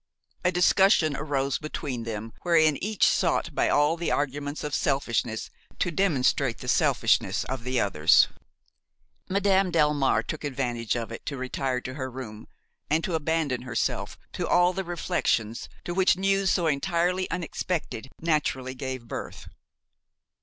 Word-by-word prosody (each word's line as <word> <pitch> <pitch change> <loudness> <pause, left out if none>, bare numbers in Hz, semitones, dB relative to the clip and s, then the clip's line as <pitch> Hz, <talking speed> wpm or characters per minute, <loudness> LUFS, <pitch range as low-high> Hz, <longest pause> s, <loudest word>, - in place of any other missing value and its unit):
A 180 - +3
discussion 180 -3 +4
arose 140 -2 -1
between 140 -6 -5
them 110 0 -5
wherein 160 -4 +3
each 210 0 +2
sought - - +1
by - - +1
all 145 +3 +3
the 170 - -2
arguments 145 +1 -2
of 150 -1 -4
selfishness 115 -5 -1 0.3
to 175 - 0
demonstrate 165 -8 +1
the - - -9
selfishness - - +2
of 130 -2 -5
the 125 0 0
others. 80 -7 +4 1.0
Madame 195 -1 +2
Delmare 150 -4 +2
took 155 - -5
advantage 125 -5 -2
of 115 -1 -4
it 115 - -7
to 140 - -3
retire 130 0 -2
to 130 - -6
her 130 -1 -4
room 115 -4 -8 0.4
and 160 +2 +2
to 180 - -2
abandon 155 -5 0
herself 125 -2 -2 0.2
to - - -2
all 175 +1 +4
the 190 +1 -3
reflections 115 - -1 0.2
to 175 - -3
which 185 -1 +3
news 195 0 +2
so 175 -2 +2
entirely 175 +4 0
unexpected 165 -6 -3
naturally 150 -5 0
gave 130 -2 -5
birth. - - -7
145 Hz, 145 wpm, -26 LUFS, 130-175 Hz, 1.0 s, discussion